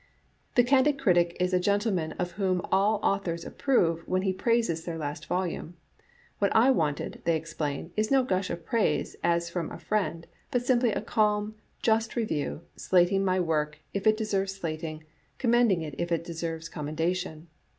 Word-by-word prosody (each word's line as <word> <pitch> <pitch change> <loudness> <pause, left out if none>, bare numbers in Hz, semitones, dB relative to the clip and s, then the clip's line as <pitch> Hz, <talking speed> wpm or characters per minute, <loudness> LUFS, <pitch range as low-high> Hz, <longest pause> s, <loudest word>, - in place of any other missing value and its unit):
" - - -40
The 245 - +6
candid 275 +3 +3
critic 175 -8 +3
is 180 +1 +1
a 180 - +4
gentleman 200 -3 0
of 175 0 -3
whom 185 -1 0
all 200 +3 +3
au 200 - +3
thors 170 -3 -4
approve 170 -12 +1
when 185 0 0
he 190 -1 +1
praises 225 -6 +1
their 170 -1 -4
last 150 0 -5
volume. 180 -2 -2 0.6
What 200 - +2
I 240 +4 +6
wanted, 150 - -1
they 170 - +2
explain, 155 -1 -4
is 215 0 0
no 270 -1 +4
gush 185 -5 -1
of 170 -1 -5
praise, 230 -3 0
as 170 0 +1
from 170 -2 -2
a - - -8
friend, 190 -6 -2 0.2
but 245 -1 -1
simply 245 -2 +3
a - - -2
calm, 210 -1 +1 0.3
just 225 0 +2
review, 165 - -2
slating 185 +2 +3
my 185 -1 +2
work 150 -3 0 0.2
if 200 +1 -1
it 215 0 +5
deserves 195 -3 -1
slating, 155 -3 -5 0.3
commending 235 -8 +3
it 150 -2 -6
if 170 0 -2
it 165 0 +1
deserves 165 -1 -4
com 150 -3 -6
mendation. 165 +1 -2
185 Hz, 180 wpm, -28 LUFS, 165-215 Hz, 0.6 s, The